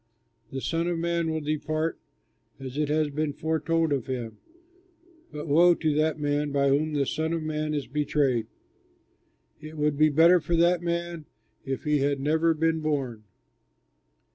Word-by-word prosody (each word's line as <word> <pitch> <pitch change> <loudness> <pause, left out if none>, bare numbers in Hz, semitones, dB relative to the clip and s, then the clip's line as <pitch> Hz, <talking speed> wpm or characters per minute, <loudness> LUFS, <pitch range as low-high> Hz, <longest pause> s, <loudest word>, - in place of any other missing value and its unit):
The 135 - -4
Son 165 +4 -1
of 175 -1 -1
Man 170 0 -1
will 160 0 -2
depart 155 +2 -2 0.6
as 130 -1 -7
it 150 0 -1
has 150 -1 +1
been 150 0 -2
foretold 160 0 0
of 135 -4 -2
him, 120 -4 -5 0.9
but 150 +1 -6
woe 170 +4 +5
to 155 -2 0
that 155 +1 +1
man 145 0 -1
by 140 0 +2
whom 150 +3 +1
the 140 -2 +1
Son 160 +4 -2
of 165 -1 -2
Man 155 0 -2
is 145 -3 -2
betrayed! 140 -5 0 1.1
It 155 +1 -9
would 150 -1 0
be 155 0 +6
better 165 +4 +5
for 170 +1 -1
that 170 +1 +3
man 170 -2 -3 0.4
if 135 -1 -3
he 150 -1 +1
had 140 0 0
never 160 +3 +2
been 160 +1 +1
born!" 135 -8 -2
155 Hz, 165 wpm, -26 LUFS, 145-160 Hz, 1.1 s, be